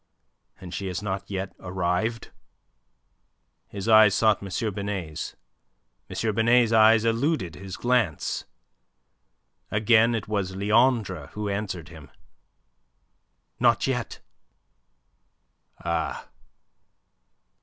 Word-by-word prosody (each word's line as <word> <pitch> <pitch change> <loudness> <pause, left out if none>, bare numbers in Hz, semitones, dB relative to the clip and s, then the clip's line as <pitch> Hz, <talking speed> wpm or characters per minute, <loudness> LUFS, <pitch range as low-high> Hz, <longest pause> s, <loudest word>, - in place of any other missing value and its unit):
And 90 -2 -9
she 95 +2 -4
has 90 +2 -4
not 95 -2 -4
yet 95 -1 -4
arrived?" 90 +5 -2 1.4
His 100 +1 -7
eyes 110 -3 +7
sought 110 -2 +3
M. 100 +2 -3
Binet's. 95 -6 -5 0.7
M. 110 -1 -1
Binet's 115 +2 +3
eyes 110 0 +5
eluded 115 - 0
his 95 +1 -8
glance. 120 - 0 1.2
Again 110 +2 +3
it 110 - -4
was 100 -3 -2
Leandre 105 - +2
who 105 0 -3
answered 95 -5 -4
him. 80 -5 -13 1.5
"Not 120 -4 +3
yet." 125 -3 -3 1.6
"Ah!" - - -2
105 Hz, 90 wpm, -25 LUFS, 95-115 Hz, 1.6 s, eyes